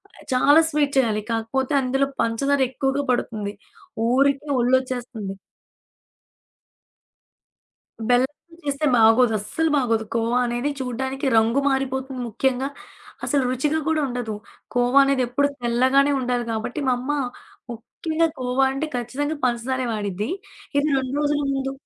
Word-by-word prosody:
అది - - -16
చాలా 285 +5 +6
స్వీటు 290 -2 +1
చేయాలి. 220 -5 +2
కాకపోతే 250 +5 -1
అందులో 270 +2 +1
పంచదార 275 +5 +1
ఎక్కువగా 270 +2 -1
పడుతుంది. 215 -4 -2 0.5
ఊరికే 275 +3 +2
ఒళ్ళొచ్చేస్తంది. 245 -4 -1 2.8
బెల్లంతో 265 +7 0
చేస్తే 285 +1 -1
బాగోదు. 225 +1 +5
అస్సలు 320 +11 -1
బాగోదు. 230 -4 +1
కోవా 230 +2 +1
అనేది 240 +4 -1
చూడ్డానికి 265 +2 -3
రంగు 230 +4 +3
మారిపోతుంది 265 -1 -2
ముఖ్యంగా. 265 +4 0 0.6
అసలు 285 -2 +2
రుచిగా 295 +5 0
కూడా 320 -1 +2
ఉండదు. 245 -4 -4 0.4
కోవా 245 +3 +4
అనేది 275 -1 +2
ఎప్పుడూ 285 +4 +1
తెల్లగానే 260 +4 +3
ఉండాలి 245 -1 -1
గాబట్టి, 225 +6 -3
మా 255 - +4
అమ్మ 265 +4 -3 0.6
ముఖ్యంగా 315 +8 -2
కోవా 255 +1 +1
అంటే 290 +4 -2
ఖచ్చితంగా 270 +6 -2
పంచదారే 250 +1 -1
వాడిద్ది. 205 0 -3 0.5
ఇది 285 +2 +2
2 265 0 -2
రోజుల 295 0 +1
ముందు 270 0 -2
260 Hz, 120 wpm, -23 LUFS, 240-275 Hz, 2.8 s, చాలా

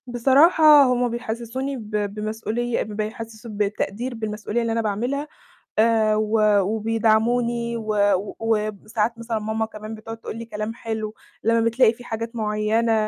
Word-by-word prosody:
بصراحة، 285 +5 +6
هُم 250 -1 +2
بيحسّسوني 240 +3 -4
ب 215 -3 -9 0.2
بمسؤولية، 220 +3 -2
ب 215 - -9
بيحسّسوا 220 +1 -6
بالتقدير 210 +3 -2
بالمسؤولية 215 +1 -3
اللي 230 -1 -1
أنا 230 0 +1
باعملها، 245 +8 -2 0.5
آآ 220 -1 +4
و 215 +1 +1 0.2
وبيدعموني، 225 +3 +1
و 205 -3 +1
وساعات 215 +1 -1
مثلًا 230 -1 -3
ماما 220 +1 -1
كمان 215 0 -8
بتقعد 225 +1 -8
تقول 225 - -7
لي 230 - -6
كلام 215 0 -4
حلو، 220 -2 -4 0.3
لمّا 230 +1 +3
بتلاقي 230 0 +4
في 245 - -13
حاجات 230 0 -5
معيّنة 215 +1 +1
225 Hz, 140 wpm, -23 LUFS, 215-235 Hz, 0.5 s, بصراحة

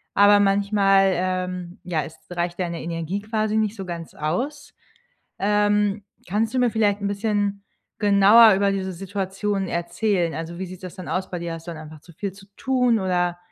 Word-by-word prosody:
aber 205 0 +6
manchmal, 195 -1 +3
ähm 180 -1 -3
ja, 175 -4 -1
es 160 - -10
reicht 175 0 -3
deine 170 -2 -3
Energie 170 +4 -3
quasi 215 0 -1
nicht 215 0 0
so 195 -3 -6
ganz 170 -2 -7
aus. 270 - -3 0.7
Ähm, 205 0 +1 0.2
kannst 215 +5 0
du 260 - 0
mir 245 -1 +3
vielleicht 210 -2 +1
'n 200 - -1
bisschen 205 -1 -1 0.3
genauer 205 +2 +7
über 200 +1 +2
diese 190 -1 -3
Situation 195 +1 -3
erzählen? 175 0 -1
Also, 165 +2 -6
wie 190 - -4
sieht 185 0 -11
das 185 -2 -8
dann 185 - -8
aus 185 0 -2
bei 180 - -3
dir? 170 -1 -4
Hast 165 +1 -10
du - - -5
dann 160 -2 -8
einfach 155 -1 -11
zu 175 - -16
viel 190 +4 -5
zu 195 +1 -15
tun, 250 -3 +2
oder, 180 -2 0
195 Hz, 185 wpm, -23 LUFS, 175-205 Hz, 0.7 s, genauer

